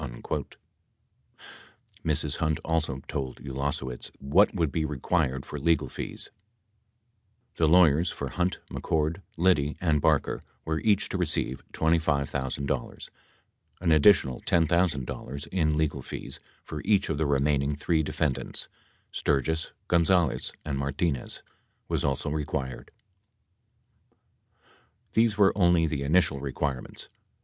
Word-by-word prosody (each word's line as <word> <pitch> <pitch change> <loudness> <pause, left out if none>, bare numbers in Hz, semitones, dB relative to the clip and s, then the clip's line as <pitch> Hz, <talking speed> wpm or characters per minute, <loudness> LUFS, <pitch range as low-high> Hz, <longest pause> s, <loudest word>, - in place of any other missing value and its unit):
78 - - -5 1.5
Mrs. - - 0
Hunt 80 -2 0
also 80 -5 -1
told 65 -2 -3
Ulasewicz 65 -2 -3
what 80 +10 +4
would 80 -6 +1
be 80 - 0
required 65 -2 0
for 75 - -6
legal 80 0 +2
fees. - - -5 1.3
The 80 - +3
lawyers 85 -1 +5
for - - -4
Hunt, 90 0 0
McCord, 80 +4 -1 0.2
Liddy 80 -4 +2
and 80 -4 +2
Barker 75 -2 +2 0.2
were 80 0 -1
each 105 0 +2
to 95 - -2
receive 75 -6 -1
$25,000; 70 -5 -1 0.7
an 85 -2 +1
additional 75 -5 +5
$10,000 80 -3 0
in 80 -5 +1
legal 80 -1 0
fees - - -6 0.2
for 75 - -6
each 100 -2 +3
of 80 -2 -1
the 80 - +1
remaining 70 0 +2
three 80 +2 +1
defendants, 75 -3 -2 0.4
Sturgis, 80 +3 0 0.2
Gonzales 85 -3 +2
and 70 -3 -2
Martinez, 70 0 -2 0.4
was - - -1
also 70 +1 -1
required. 70 -4 -3 2.2
These 110 -2 +3
were 100 -2 +5
only 90 -4 +4
the 75 -3 -2
initial 75 0 +2
requirements. 70 -1 -4
75 Hz, 115 wpm, -28 LUFS, 70-85 Hz, 2.2 s, lawyers